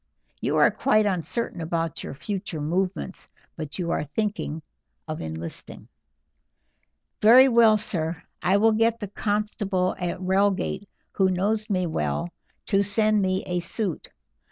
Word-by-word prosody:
You - - 0
are - - +5
quite 215 0 +2
uncertain 190 +1 -2
about 165 -1 -3
your - - -7
future 190 +1 -4
movements, 185 +5 -3 0.3
but 155 -3 -7
you 170 -2 -2
are - - 0
thinking 165 -1 -3 0.4
of 155 -1 -5
enlisting." 80 +1 -8 1.3
"Very 245 +5 +8
well, 230 -3 +5
sir, 165 -6 +1 0.2
I 190 +2 +3
will 225 +2 +4
get 225 +1 +2
the 205 -3 -5
constable 205 -3 -1
at 175 -1 -3
Reigate, 195 +2 0 0.2
who 190 -1 +2
knows 210 +4 0
me 185 -3 +1
well, 75 - -2 0.4
to 195 -1 +2
send 215 +1 +2
me 185 0 0
a 180 0 -1
suit. 180 0 -2
190 Hz, 135 wpm, -25 LUFS, 170-215 Hz, 1.3 s, Very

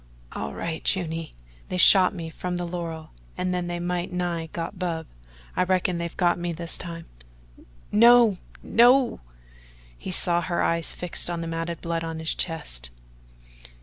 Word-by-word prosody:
"All 70 - -5
right, 165 -1 -4
Juny. 165 -3 -2 0.4
They 185 - -3
shot 185 +1 +8
me 165 -3 -7
from 180 +2 -4
the 175 - -2
laurel 170 -2 -6 0.3
and 185 0 -1
they 175 -1 -3
might 175 +1 -3
nigh 175 -2 -2
got 170 +2 -6
Bub. 165 -3 -3 0.5
I - - +1
reckon 185 -1 0
they've 170 0 -5
got 175 -1 +2
me 175 0 -3
this 170 0 +3
time." 165 -2 -7 0.9
"No 235 -3 +6 0.2
no!" 245 +2 +4 0.8
He - - -8
saw 175 -1 +2
her 175 0 -1
eyes 165 -1 +1
fixed 180 0 -1
on 170 -1 -3
the 165 - -5
matted 165 0 -4
blood 165 -1 -3
on 165 -1 -5
his 160 0 0
chest. 150 - -4
175 Hz, 155 wpm, -25 LUFS, 165-180 Hz, 0.9 s, shot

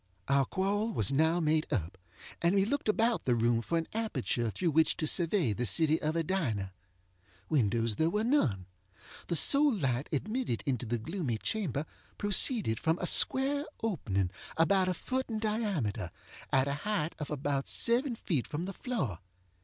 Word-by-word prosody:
Our 140 0 +3
quarrel 205 - -1
was 105 - +1
now 160 +5 +2
made 155 -1 0
up, 95 - -2 0.5
and 170 +3 +2
we 195 0 +3
looked 280 +1 -2
about 225 +2 +1
the 125 - +2
room 115 0 +1
for 165 +9 -2
an 165 - -2
aperture 140 - -2
through 170 - -1
which 160 +2 +2
to 155 - -1
survey 165 - +3
the 120 +3 -1
city 155 - +3
of 155 +1 -1
Edina. 135 - -2 0.8
Windows 115 -5 +1
there 160 - +2
were 210 +5 -1
none. 135 - +1 0.6
The 170 - -1
sole 285 - +6
light 135 - -1
admitted 215 - -2
into 125 -4 -2
the 120 +2 -1
gloomy 140 - -3
chamber 170 - -2 0.3
proceeded 205 - +1
from 160 +1 +1
a 180 - -3
square 275 +9 +4 0.2
opening, 100 - -1 0.3
about 185 +3 +3
a 180 - -1
foot 260 +7 -3
in 220 - -3
diameter, 200 - -2 0.4
at 135 +1 +3
a 140 - -1
height 205 -7 -2
of 150 - -5
about 140 -1 -2
seven 240 +2 +1
feet 155 - -2
from 155 +3 -4
the 195 +2 -5
floor. 175 - -3
160 Hz, 170 wpm, -30 LUFS, -, 0.8 s, sole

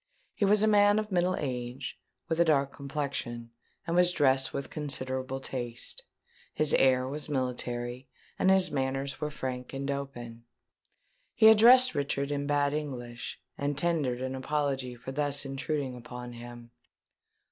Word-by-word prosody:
He 205 - 0
was 205 +1 +4
a - - +4
man 205 -1 +5
of 215 -1 -2
middle 180 0 +2
age, 125 -1 -4 0.3
with 160 - -1
a - - +7
dark 140 -3 +2
complexion, 135 -5 -4 0.3
and 170 -1 -1
was 180 0 +5
dressed 135 -5 +3
with 140 - -5
considerable 130 -3 -3
taste. 125 - -5 0.5
His 155 -1 +2
air 130 -1 +4
was 150 +3 -4
military, 125 -2 -3 0.3
and 190 - +3
his 190 -3 +4
manners 135 0 -2
were 150 - -1
frank 130 -3 -5
and 135 +1 -2
open. 120 -4 -6 0.9
He 220 0 +8
addressed 245 +4 +7
Richard 140 -1 -1
in 145 0 -2
bad 145 0 +2
English, 125 -5 -5 0.2
and 140 0 -1
tendered 145 -6 +1
an 130 0 -3
apology 135 -2 -2
for 125 +2 -8
thus 145 0 0
intruding 135 0 -3
upon 125 0 -8
him. 120 0 -10
140 Hz, 145 wpm, -29 LUFS, 125-150 Hz, 0.9 s, He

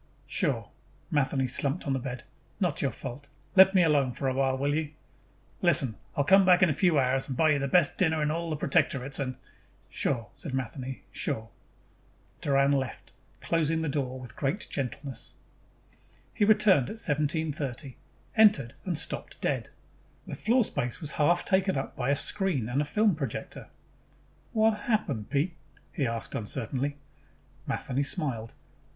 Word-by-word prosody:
"Sure." - - 0 0.4
Matheny 135 -2 +1
slumped 140 +6 0
on 140 - 0
the 135 - 0
bed. 130 0 -6 0.4
"Not 175 -7 0
your 140 - +1
fault. 130 +4 -8 0.3
Let 190 0 +8
me 180 - +6
alone 145 -6 +2
for 135 - -3
a 130 - +1
while, 135 0 +1
will 140 +2 0
you?" 155 0 -2 0.7
"Listen, 140 - +3 0.2
I - - +4
will - - 0
come 195 +4 +6
back 180 0 +5
in 175 - +5
a - - +1
few 165 +1 +2
hours 135 0 +2
and 130 -3 -4
buy 160 -1 +4
you 145 - +2
the 140 - -1
best 170 +2 +3
dinner 160 -3 +2
in 150 - +1
all 170 +1 -2
the 155 - -1
Protectorates 135 -1 +1
and 130 -2 -2 0.3
" - - -34
"Sure," 115 -4 0
said 135 -5 -6
Matheny. 130 +1 -5
"Sure." 110 -6 -2 0.9
Doran 140 0 +3
left, 135 -3 -2 0.3
closing 160 -1 +1
the 160 - -1
door 130 -2 -2
with 125 -3 -10
great 145 +9 -1
gentleness. 125 -2 -4 1.0
He 205 - +2
returned 210 - +5
at 220 - -6
1730, 145 - -1 0.4
entered, 210 - +5
and 180 -4 -2
stopped 160 - -2
dead. - - -1 0.6
The - - -6
floor 245 +2 +2
space 125 - -2
was 155 -5 -1
half 170 +4 +2
taken 190 -3 +2
up 135 - -4
by 125 0 -2
a 140 - +4
screen 170 - +1
and 135 +4 +1
a - - -1
film 210 +6 +2
projector. 135 -7 -5 0.8
"What 220 -1 +2
happened, 140 - 0
Pete?" 150 +5 0 0.4
he 135 - -1
asked 115 0 -4
uncertainly. 135 +5 -2 0.7
Matheny 135 +1 -1
smiled. 135 - -1
140 Hz, 165 wpm, -28 LUFS, 130-170 Hz, 1.0 s, Let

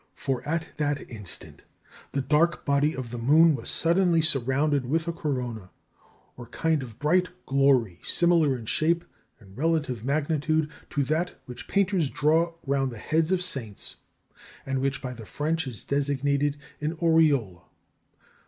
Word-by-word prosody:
For 135 -2 -2
at 165 0 -1
that 145 -3 -2
instant 105 -5 -5 0.5
the 140 - -1
dark 155 +5 +2
body 145 +2 +2
of 125 -3 -6
the 120 - -5
moon 155 +7 +5
was - - -5
suddenly 170 0 +3
surrounded 140 -1 +1
with 160 +4 0
a 170 - -1
corona, 125 - -4 0.7
or 120 -1 -10
kind 160 +4 0
of 115 -4 -9
bright 180 +5 +2 0.2
glory 135 -9 +2
similar 165 -6 +3
in 115 - -9
shape 165 +8 +1 0.3
and 95 -4 -17
relative 150 -6 0
magnitude 155 +2 0 0.2
to 145 - 0
that 160 +6 -1
which 125 +1 -9
painters 190 -6 +1
draw 165 +4 +2
round 135 -1 0
the 115 - -8
heads 160 +9 0
of 185 -1 +1
saints, 120 - -5 0.7
and 135 -1 -1
which 135 0 -1
by 125 -1 -4
the 110 -3 -11
French 160 0 -2
is 115 -6 -6
designated 140 +1 0 0.2
an 155 +3 -2
auréole. 150 - +2
145 Hz, 150 wpm, -26 LUFS, 130-160 Hz, 0.7 s, moon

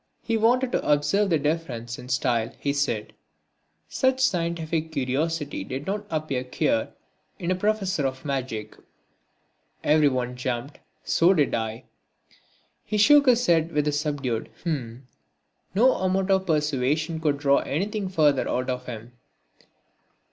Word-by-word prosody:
He 230 - 0
wanted 245 +3 +2
to - - 0
observe 150 +8 +2
the 165 - +3
differences 140 -7 -3
in 125 0 -10
style, 120 -3 0
he 140 - -1
said. 120 -7 -1 0.7
Such 260 0 +1
scientific 165 -7 0
curiosity 145 +2 -2
did 135 +3 -5
not 205 +2 -3
appear 155 -5 -2
queer 115 -3 -1 0.4
in 175 +1 -2
a - - +2
professor 195 -6 0
of 130 +1 -7
magic. 125 -6 -3 1.1
Everyone 130 -5 +2
jumped, 125 +2 -4 0.2
so 180 +4 +3
did 150 -4 +2
I. 110 0 -3 1.0
He 215 - -2
shook 285 +7 +6
his 245 -1 +4
head 165 -3 +2
with 150 0 +1
a - - +2
subdued 145 -6 -2
"h'm." 130 -7 -3 0.7
No 250 +6 +5
amount 190 +1 0
of 190 0 +2
persuasion 150 +1 0
could 150 -3 +1
draw 140 -1 +3
anything 195 +6 -2
further 150 -6 +2
out 125 +1 -1
of 125 0 -5
him. 115 -1 -7
150 Hz, 135 wpm, -25 LUFS, 130-185 Hz, 1.1 s, shook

